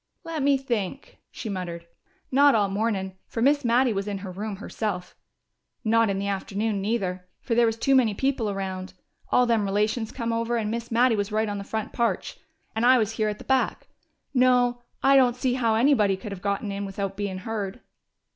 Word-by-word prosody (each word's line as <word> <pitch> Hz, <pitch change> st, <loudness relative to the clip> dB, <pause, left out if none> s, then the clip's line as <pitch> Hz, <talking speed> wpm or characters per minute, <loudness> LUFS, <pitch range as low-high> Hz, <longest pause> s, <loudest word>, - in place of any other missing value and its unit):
"Let 330 Hz, -2 st, -4 dB
me 280 Hz, 0 st, +4 dB
think," 245 Hz, -2 st, -4 dB
she 230 Hz, -, -7 dB
muttered. 175 Hz, -4 st, -5 dB, 0.5 s
"Not 280 Hz, +1 st, +6 dB
all 205 Hz, -2 st, +2 dB
mornin', 195 Hz, -2 st, -1 dB
fer -, -, -5 dB
Miss 285 Hz, +4 st, +3 dB
Mattie 245 Hz, 0 st, +3 dB
was 195 Hz, 0 st, -2 dB
in 205 Hz, -1 st, -2 dB
her 185 Hz, -, -5 dB
room 205 Hz, +3 st, -4 dB
herself. 195 Hz, -2 st, -4 dB, 0.7 s
Not 230 Hz, -1 st, +3 dB
in 195 Hz, -, 0 dB
the 200 Hz, +1 st, -2 dB
afternoon, 200 Hz, +1 st, -2 dB
neither, 190 Hz, -4 st, -2 dB
fer 240 Hz, -, -3 dB
there 235 Hz, 0 st, +4 dB
was 225 Hz, 0 st, -1 dB
too 270 Hz, +4 st, +2 dB
many 240 Hz, -6 st, +4 dB
people 265 Hz, -3 st, 0 dB
around. 190 Hz, -1 st, -4 dB, 0.4 s
All 250 Hz, -, +5 dB
them 230 Hz, -3 st, +2 dB
relations 210 Hz, +3 st, 0 dB
come 230 Hz, -2 st, -2 dB
over, 230 Hz, +1 st, 0 dB
and 215 Hz, -2 st, -1 dB
Miss 235 Hz, 0 st, -4 dB
Mattie 240 Hz, 0 st, +3 dB
was 205 Hz, 0 st, -2 dB
right 215 Hz, +1 st, +1 dB
on 205 Hz, -1 st, -3 dB
the -, -, -5 dB
front 220 Hz, +1 st, -4 dB
parch 235 Hz, -1 st, -1 dB, 0.4 s
and 220 Hz, -, 0 dB
I 255 Hz, +1 st, +7 dB
was 220 Hz, -3 st, +1 dB
here 220 Hz, -1 st, 0 dB
at 210 Hz, -, -4 dB
the -, -, -11 dB
back.... 265 Hz, -1 st, 0 dB, 0.4 s
No, 250 Hz, -1 st, +3 dB, 0.2 s
I 275 Hz, 0 st, +6 dB
don't 250 Hz, -3 st, +5 dB
see 250 Hz, 0 st, 0 dB
how 230 Hz, -3 st, +1 dB
anybody 220 Hz, -6 st, +3 dB
could 210 Hz, +1 st, -8 dB
have 195 Hz, -2 st, -7 dB
got 200 Hz, +1 st, -1 dB
in 200 Hz, -1 st, -3 dB
without 195 Hz, 0 st, -4 dB
bein' 200 Hz, -2 st, -3 dB
heard." 205 Hz, +2 st, -4 dB
220 Hz, 205 wpm, -25 LUFS, 200-245 Hz, 0.7 s, I